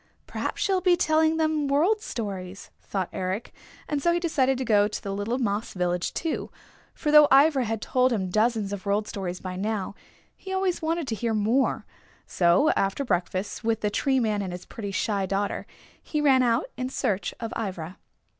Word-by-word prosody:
"Perhaps -, -, -3 dB
she'll 380 Hz, -2 st, +1 dB
be 360 Hz, -1 st, +4 dB
telling 315 Hz, 0 st, +3 dB
them 310 Hz, -2 st, +1 dB
World 340 Hz, +10 st, +2 dB
Stories," 195 Hz, -, -6 dB
thought 190 Hz, -3 st, -3 dB
Eric, 185 Hz, +4 st, -3 dB, 0.3 s
and 295 Hz, -2 st, -1 dB
so 340 Hz, -, +3 dB
he 345 Hz, -, +1 dB
decided 270 Hz, -6 st, +1 dB
to 260 Hz, -, -3 dB
go 205 Hz, -2 st, +4 dB
to 210 Hz, -, -5 dB
the 195 Hz, -, -5 dB
little 205 Hz, +5 st, -2 dB
moss 215 Hz, -4 st, -2 dB
village, 180 Hz, -1 st, -1 dB
too, 325 Hz, -2 st, -2 dB, 0.5 s
for 300 Hz, -, -1 dB
though 300 Hz, -1 st, +8 dB
Ivra 275 Hz, -1 st, +5 dB
had 225 Hz, -1 st, -3 dB
told 255 Hz, 0 st, +2 dB
him 190 Hz, -6 st, -1 dB
dozens 215 Hz, -1 st, +1 dB
of 200 Hz, 0 st, -6 dB
World 205 Hz, +1 st, +1 dB
Stories 185 Hz, -3 st, -4 dB
by 185 Hz, -1 st, -5 dB
now, 205 Hz, 0 st, -2 dB, 0.4 s
he 380 Hz, -, -9 dB
always 380 Hz, -2 st, 0 dB
wanted 325 Hz, -1 st, -1 dB
to -, -, -1 dB
hear 225 Hz, +1 st, -1 dB
more. 225 Hz, +6 st, +1 dB, 0.4 s
So 175 Hz, -, +3 dB
after 195 Hz, +8 st, 0 dB
breakfast 185 Hz, -1 st, -2 dB
with 225 Hz, 0 st, 0 dB
the 210 Hz, -, 0 dB
Tree 265 Hz, +4 st, +1 dB
Man 215 Hz, -4 st, 0 dB
and 185 Hz, -2 st, -4 dB
his 180 Hz, -, -8 dB
pretty, 205 Hz, -3 st, -6 dB
shy 195 Hz, 0 st, -1 dB
daughter, 200 Hz, +1 st, -2 dB, 0.3 s
he 300 Hz, -, -3 dB
ran 275 Hz, -3 st, +5 dB
out 235 Hz, -1 st, +2 dB
in 255 Hz, 0 st, -2 dB
search 200 Hz, -6 st, -2 dB
of 230 Hz, -1 st, -5 dB
Ivra. 185 Hz, -5 st, -5 dB
225 Hz, 190 wpm, -26 LUFS, 195-285 Hz, 0.5 s, though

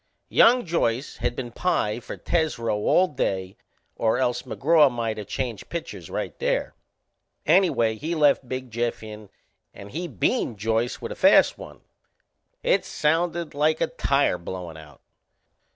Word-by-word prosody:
Young 245 Hz, 0 st, +5 dB
Joyce 140 Hz, -7 st, -1 dB
had 120 Hz, +1 st, -2 dB
been 120 Hz, -2 st, -5 dB
pie 115 Hz, -8 st, 0 dB
for -, -, -8 dB
Tesreau 155 Hz, -10 st, -1 dB
all 180 Hz, -, +3 dB
day 95 Hz, -, -2 dB, 0.4 s
or 110 Hz, -1 st, +1 dB
else 125 Hz, -2 st, 0 dB
McGraw 150 Hz, +3 st, +3 dB
might 115 Hz, -2 st, -3 dB
of 105 Hz, -, -7 dB
changed 115 Hz, -4 st, -4 dB
pitchers 170 Hz, -1 st, -6 dB
right -, -, -4 dB
there. -, -, -1 dB, 0.7 s
Anyway 120 Hz, -12 st, +3 dB
he 160 Hz, +7 st, -3 dB
left 145 Hz, -4 st, +3 dB
Big 130 Hz, -1 st, -5 dB
Jeff 120 Hz, 0 st, -2 dB
in 105 Hz, -1 st, -10 dB, 0.5 s
and 100 Hz, 0 st, -11 dB
he 175 Hz, +3 st, -4 dB
beaned 115 Hz, -, -1 dB
Joyce 115 Hz, +3 st, -1 dB
with -, -, -4 dB
a -, -, -5 dB
fast -, -, +5 dB
one. -, -, -12 dB, 0.8 s
It -, -, +2 dB
sounded 165 Hz, +2 st, -1 dB
like 155 Hz, +2 st, +1 dB
a -, -, +2 dB
tire 140 Hz, -10 st, +1 dB
blowin' 85 Hz, -1 st, -7 dB
out. 75 Hz, -3 st, -14 dB
125 Hz, 150 wpm, -24 LUFS, 110-160 Hz, 0.8 s, Young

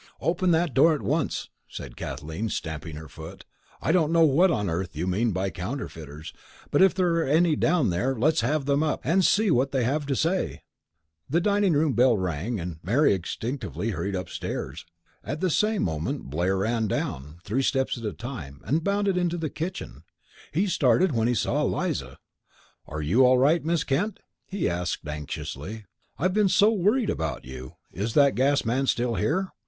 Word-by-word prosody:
"Open 180 Hz, +2 st, +1 dB
that 165 Hz, -3 st, +2 dB
door 155 Hz, +4 st, +5 dB
at 150 Hz, -, -6 dB
once!" 150 Hz, +3 st, -1 dB, 0.2 s
said -, -, -8 dB
Kathleen, 80 Hz, +10 st, -5 dB
stamping 80 Hz, -4 st, -5 dB
her 80 Hz, +1 st, -8 dB
foot. 80 Hz, +2 st, -11 dB, 0.4 s
"I -, -, +2 dB
don't 165 Hz, -3 st, +3 dB
know 165 Hz, -1 st, +5 dB
what 160 Hz, +6 st, +4 dB
on 105 Hz, -, 0 dB
earth 85 Hz, 0 st, -3 dB
you 80 Hz, +4 st, -2 dB
mean 100 Hz, +6 st, +1 dB
by 95 Hz, +1 st, -1 dB
counterfeiters, 80 Hz, -, -6 dB, 0.4 s
but -, -, +3 dB
if 190 Hz, -1 st, +5 dB
there 180 Hz, -3 st, +2 dB
are 165 Hz, -, +2 dB
any 160 Hz, +2 st, +3 dB
down 160 Hz, -, +2 dB
there, 125 Hz, +10 st, 0 dB
let's 150 Hz, +3 st, +2 dB
have 140 Hz, +4 st, 0 dB
them 140 Hz, +1 st, +2 dB
up, 155 Hz, -2 st, 0 dB
and 180 Hz, +7 st, +2 dB
see 210 Hz, +1 st, +3 dB
what 135 Hz, 0 st, +2 dB
they 130 Hz, -3 st, +1 dB
have 140 Hz, +4 st, -1 dB
to 135 Hz, -, 0 dB
say." 170 Hz, +7 st, -1 dB, 0.7 s
The 160 Hz, +6 st, +2 dB
dining 200 Hz, -1 st, +2 dB
room 150 Hz, -1 st, +2 dB
bell 120 Hz, -2 st, +4 dB
rang, 95 Hz, +5 st, -2 dB
and 85 Hz, -2 st, -6 dB
Mary 120 Hz, -, +3 dB
instinctively 115 Hz, +4 st, -3 dB
hurried 100 Hz, 0 st, -3 dB
upstairs. 85 Hz, -4 st, -5 dB, 0.4 s
At 145 Hz, +3 st, -4 dB
the 185 Hz, 0 st, +1 dB
same 215 Hz, +5 st, +1 dB
moment 80 Hz, -4 st, -3 dB
Blair 90 Hz, +6 st, 0 dB
ran 110 Hz, +3 st, 0 dB
down, 75 Hz, -4 st, -3 dB
three 115 Hz, +8 st, 0 dB
steps 135 Hz, 0 st, +1 dB
at 120 Hz, -, -9 dB
a 105 Hz, -, -2 dB
time, 75 Hz, -, -8 dB
and 160 Hz, +3 st, 0 dB
bounded 200 Hz, -1 st, +1 dB
into 175 Hz, -1 st, 0 dB
the 160 Hz, -4 st, -3 dB
kitchen. 180 Hz, +5 st, -5 dB, 0.5 s
He 200 Hz, -, +1 dB
started 170 Hz, -, +3 dB
when 115 Hz, -3 st, +1 dB
he 120 Hz, -, +1 dB
saw -, -, 0 dB
Eliza. -, -, -2 dB, 0.7 s
"Are 75 Hz, +1 st, -5 dB
you 105 Hz, -, +4 dB
all 130 Hz, 0 st, +6 dB
right, 150 Hz, +6 st, +3 dB
Miss 165 Hz, 0 st, +1 dB
Kent?" 185 Hz, +10 st, -1 dB, 0.3 s
he 200 Hz, 0 st, -1 dB
asked, 85 Hz, -3 st, -3 dB
anxiously. 75 Hz, +7 st, -6 dB, 0.3 s
"I've 180 Hz, +5 st, +1 dB
been 210 Hz, -1 st, +3 dB
so 200 Hz, +4 st, +5 dB
worried 215 Hz, +4 st, +2 dB
about 80 Hz, -2 st, -3 dB
you. 65 Hz, 0 st, -9 dB, 0.2 s
Is 105 Hz, +5 st, -3 dB
that 140 Hz, -2 st, +5 dB
gas 140 Hz, +1 st, +2 dB
man 130 Hz, +4 st, 0 dB
still 120 Hz, -1 st, +1 dB
here? 185 Hz, -, 0 dB
130 Hz, 185 wpm, -26 LUFS, -, 0.7 s, all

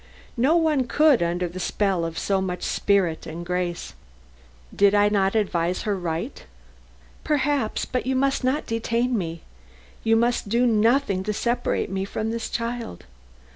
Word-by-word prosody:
No 270 Hz, +8 st, +3 dB
one 310 Hz, -6 st, +2 dB
could, 300 Hz, -, +4 dB
under 175 Hz, +1 st, 0 dB
the 175 Hz, +2 st, -8 dB
spell 190 Hz, -1 st, 0 dB
of 165 Hz, 0 st, -5 dB
so 195 Hz, -1 st, 0 dB
much 180 Hz, -1 st, -3 dB
spirit 190 Hz, -5 st, +1 dB
and 170 Hz, +2 st, -6 dB
grace. 180 Hz, -1 st, -3 dB, 0.8 s
"Did 200 Hz, 0 st, +4 dB
I 205 Hz, 0 st, +4 dB
not 195 Hz, 0 st, +1 dB
advise 180 Hz, -4 st, 0 dB
her 210 Hz, -3 st, 0 dB
right?" 170 Hz, -3 st, -4 dB, 0.8 s
"Perhaps, 285 Hz, -6 st, 0 dB
but 250 Hz, -1 st, -3 dB
you 265 Hz, -, +1 dB
must 270 Hz, +1 st, +1 dB
not 265 Hz, +4 st, 0 dB
detain 235 Hz, +2 st, 0 dB
me. 170 Hz, -5 st, -3 dB, 0.6 s
You 225 Hz, 0 st, +3 dB
must 235 Hz, -2 st, +1 dB
do 235 Hz, +3 st, +2 dB
nothing 225 Hz, -2 st, +2 dB
to 210 Hz, -, -1 dB
separate 235 Hz, 0 st, -1 dB
me 190 Hz, 0 st, -1 dB
from 215 Hz, +3 st, -3 dB
this 230 Hz, 0 st, -3 dB
child. 235 Hz, -, -4 dB
215 Hz, 155 wpm, -24 LUFS, 185-245 Hz, 0.8 s, could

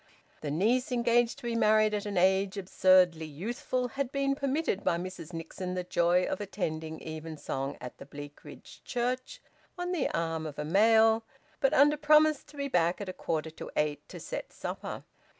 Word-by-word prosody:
The 150 Hz, -, -3 dB
niece, 225 Hz, -, +1 dB
engaged 240 Hz, -1 st, +2 dB
to -, -, -15 dB
be 235 Hz, -1 st, -2 dB
married 215 Hz, -1 st, +4 dB
at 210 Hz, 0 st, -2 dB
an 200 Hz, -2 st, -3 dB
age 190 Hz, +2 st, +3 dB
absurdly 185 Hz, -3 st, +4 dB
youthful, 240 Hz, -, -3 dB
had 270 Hz, +1 st, -3 dB
been 275 Hz, 0 st, +1 dB
permitted 275 Hz, -6 st, -1 dB
by 170 Hz, -, +2 dB
Mrs 180 Hz, -2 st, -7 dB
Nixon 180 Hz, +2 st, -5 dB
the 180 Hz, -, -2 dB
joy 175 Hz, +1 st, +2 dB
of -, -, -3 dB
attending 160 Hz, -6 st, -4 dB
evensong 155 Hz, -3 st, -5 dB
at 125 Hz, 0 st, -9 dB
the -, -, -10 dB
Bleakridge 145 Hz, 0 st, -11 dB
Church 255 Hz, -, -3 dB, 0.3 s
on 355 Hz, 0 st, -3 dB
the 340 Hz, -7 st, 0 dB
arm 165 Hz, -1 st, -2 dB
of 150 Hz, -, -8 dB
a 150 Hz, -, -3 dB
male, 220 Hz, +5 st, +5 dB, 0.4 s
but 270 Hz, -2 st, +2 dB
under 295 Hz, +2 st, +5 dB
promise 305 Hz, 0 st, +4 dB
to 295 Hz, 0 st, -16 dB
be 280 Hz, 0 st, -2 dB
back 175 Hz, -7 st, +1 dB
at 200 Hz, -2 st, -5 dB
a -, -, -4 dB
quarter 160 Hz, -2 st, -3 dB
to 160 Hz, -, -8 dB
eight 150 Hz, -1 st, 0 dB
to -, -, -8 dB
set -, -, -6 dB
supper. -, -, -6 dB
195 Hz, 180 wpm, -30 LUFS, 165-250 Hz, 0.4 s, male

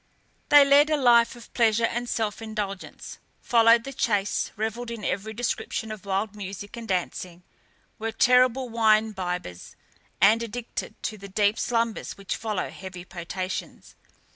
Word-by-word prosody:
They 290 Hz, -1 st, +8 dB
led 285 Hz, +2 st, +5 dB
a 305 Hz, -, +2 dB
life 240 Hz, -4 st, +4 dB
of 240 Hz, -1 st, -14 dB
pleasure 230 Hz, -1 st, +3 dB
and 240 Hz, +1 st, -3 dB
self 220 Hz, 0 st, -2 dB
indulgence, 210 Hz, -3 st, -6 dB, 0.2 s
followed 230 Hz, -1 st, +4 dB
the 275 Hz, -, -7 dB
chase, 205 Hz, -6 st, 0 dB
revelled 225 Hz, +3 st, -3 dB
in 230 Hz, -3 st, -6 dB
every 200 Hz, +4 st, -2 dB
description 220 Hz, -1 st, -3 dB
of 215 Hz, -2 st, -8 dB
wild 200 Hz, +2 st, -1 dB
music 200 Hz, 0 st, -7 dB
and 230 Hz, -1 st, -8 dB
dancing, 180 Hz, -1 st, -3 dB, 0.6 s
were 225 Hz, +1 st, -2 dB
terrible 250 Hz, +2 st, +4 dB
wine 220 Hz, -1 st, +3 dB
bibbers, 180 Hz, -, -5 dB, 0.4 s
and 220 Hz, +3 st, +5 dB
addicted 235 Hz, +1 st, -5 dB
to 215 Hz, -2 st, -4 dB
the 200 Hz, 0 st, -10 dB
deep 205 Hz, +2 st, +1 dB
slumbers 230 Hz, -2 st, -1 dB
which 195 Hz, -1 st, -4 dB
follow 215 Hz, -4 st, -3 dB
heavy 185 Hz, -2 st, -9 dB
potations. 185 Hz, +1 st, -6 dB
220 Hz, 145 wpm, -26 LUFS, 200-235 Hz, 0.6 s, They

